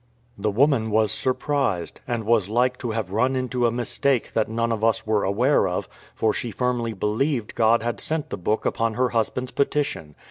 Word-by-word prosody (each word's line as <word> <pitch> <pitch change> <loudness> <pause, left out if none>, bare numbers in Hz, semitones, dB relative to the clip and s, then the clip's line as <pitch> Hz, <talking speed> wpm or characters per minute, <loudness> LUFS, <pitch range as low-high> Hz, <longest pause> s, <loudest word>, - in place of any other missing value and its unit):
The 105 +1 -1
woman 120 0 +2
was 110 -1 +2
surprised, 130 - -1
and 120 -2 -2
was 110 -3 +2
like 125 +3 +2
to 120 - -4
have 110 -4 -3
run 125 +6 +1
into 125 -1 0
a - - 0
mistake 125 +1 0
that 110 -1 +1
none 115 +1 -1
of 110 -1 -2
us 115 -1 +2
were 110 -2 +1
aware 115 +3 +2
of; 90 - -3 0.3
for 110 -1 +1
she 120 - -3
firmly 120 -1 -1
believed 110 +5 -1
God 115 0 +3
had 120 0 -2
sent 155 -1 -2
the - - -3
book 105 +5 -1
upon 115 -1 0
her 125 0 +2
husband's 120 +2 -1
petition. 140 - -1
115 Hz, 190 wpm, -24 LUFS, 110-125 Hz, 0.3 s, God